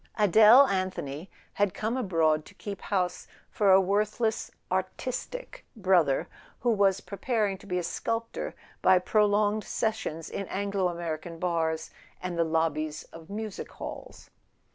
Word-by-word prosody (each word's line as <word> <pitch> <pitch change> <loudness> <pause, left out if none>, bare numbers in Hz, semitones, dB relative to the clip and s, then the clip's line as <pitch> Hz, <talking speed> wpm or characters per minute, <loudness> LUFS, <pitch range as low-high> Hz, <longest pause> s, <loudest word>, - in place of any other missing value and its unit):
Adele 215 +6 +8
Anthony 185 - -3 0.2
had 205 -2 +1
come 220 +3 -1
abroad 165 -10 +2
to - - -15
keep 200 -2 -7
house 180 -3 -1 0.2
for 200 -2 +3
a 190 - +8
worthless 210 +3 0 0.2
"artis¬ 190 +7 -2
tic" - - -9
brother, 185 -9 +2 0.3
who 240 - +2
was 195 -3 +3
preparing 210 0 -1
to 200 - -15
be 180 -2 -1
a 180 - -1
sculptor 230 +6 -3 0.3
by 185 0 +6
prolonged 210 +2 +2
sessions 215 -8 -2
in 195 - -5
Anglo 200 -1 -1
American 170 -1 -4
bars 160 -2 -1 0.3
and 180 -1 -4
the 170 - +2
lobbies 155 -1 -1
of 165 +1 -12
music 215 0 -6
halls. - - -9
190 Hz, 140 wpm, -28 LUFS, 170-210 Hz, 0.3 s, Adele